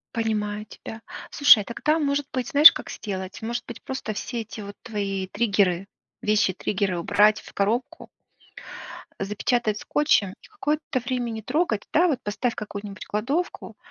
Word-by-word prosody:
Понимаю 210 -2 -1
тебя. 220 +2 -10 0.3
Слушай, 250 -8 +6
тогда 305 +8 0
может 285 -1 0
быть, 255 -2 -2
знаешь, 305 0 +10
как - - -8
сделать? 190 -2 -6
Может 235 +2 -3
быть, 235 - -9
просто 265 -5 -4
все 235 +3 -4
эти, 220 0 -8
вот, 200 0 -8
твои 195 -3 -3
триггеры- 195 -3 +1 0.3
вещи-триггеры 200 -2 0
убрать 210 +5 +3
в - - -14
коробку, 220 +6 -1 1.1
запечатать 210 +2 0
скотчем 285 -6 +2
и - - -16
какое-то 300 -9 -2
время 245 0 -2
не 220 -1 -6
трогать. 250 - 0
Да, 345 +3 +5
вот 285 -7 0
поставь 225 +4 -1
в - - -16
какую-нибудь 205 -1 -7
кладовку, 270 +12 -3
220 Hz, 145 wpm, -24 LUFS, 205-255 Hz, 1.1 s, знаешь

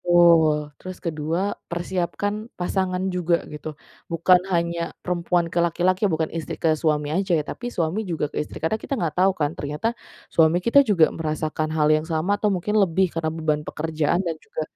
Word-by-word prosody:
betul. 160 -4 +4
Terus 185 0 -7
ke-2, 160 +2 -2 0.3
persiapkan 185 +5 -2
pasangan 185 +1 -1
juga 175 -1 +1
gitu. 150 0 -7 0.3
Bukan 175 +2 +4
hanya 170 -1 -1
perempuan 175 -1 0
ke 170 - +2
laki-laki, 185 +4 +2
bukan 160 -2 -1
istri 165 -4 -4
ke 160 -1 +2
suami 150 -1 0
aja 185 -1 +1
ya, 150 - 0
tapi 245 +8 -6
suami 185 +1 -2
juga 155 -3 -2
ke - - -2
istri. 150 - -6
Karena 215 +7 0
kita 275 - -3
nggak 170 -7 -1
tahu 190 0 +3
kan, 145 -1 0
ternyata 150 +9 -2 0.4
suami 165 +1 +4
kita 280 +4 +6
juga 170 -7 +4
merasakan 155 -1 -2
hal 150 0 +4
yang 155 +2 +1
sama 175 +6 0
atau 210 - +2
mungkin 205 +3 +1
lebih 185 -1 +2
karena 165 -1 -2
beban 155 -1 -1
pekerjaan 160 +3 -1
dan 165 -2 -1
juga 160 - -5
170 Hz, 180 wpm, -23 LUFS, 155-185 Hz, 0.4 s, kita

